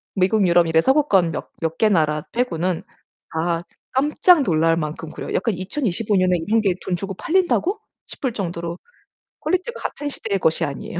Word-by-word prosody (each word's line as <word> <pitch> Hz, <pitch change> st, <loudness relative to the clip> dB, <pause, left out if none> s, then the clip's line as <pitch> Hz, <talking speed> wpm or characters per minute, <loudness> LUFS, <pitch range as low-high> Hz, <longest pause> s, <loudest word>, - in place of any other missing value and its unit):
미국, 195 Hz, +2 st, +3 dB
유럽 170 Hz, -1 st, +4 dB
이런 160 Hz, 0 st, +4 dB
서구권 205 Hz, -, +3 dB
몇 -, -, -5 dB
몇 165 Hz, 0 st, -2 dB
개 220 Hz, -, +4 dB
나라 155 Hz, -5 st, +1 dB
빼고는 185 Hz, -8 st, -1 dB, 0.5 s
다 165 Hz, +1 st, -1 dB, 0.3 s
깜짝 295 Hz, +4 st, +4 dB
놀랄 165 Hz, -3 st, +2 dB
만큼 155 Hz, 0 st, -4 dB
구려요. -, -, -6 dB
약간 220 Hz, +2 st, +1 dB
'2025년에 185 Hz, -3 st, 0 dB
이런 225 Hz, +1 st, +3 dB
게 195 Hz, -4 st, +1 dB
돈 180 Hz, -, 0 dB
주고 195 Hz, +2 st, -4 dB
팔린다고?' 370 Hz, -, +1 dB, 0.3 s
싶을 260 Hz, -4 st, -3 dB
정도로 170 Hz, -3 st, -4 dB, 0.6 s
퀄리티가 370 Hz, +6 st, -1 dB
같은 290 Hz, -, -4 dB
시대의 200 Hz, -7 st, -2 dB
것이 160 Hz, 0 st, +1 dB
아니에요. 145 Hz, +4 st, -5 dB
185 Hz, 335 characters per minute, -22 LUFS, 165-245 Hz, 0.6 s, 유럽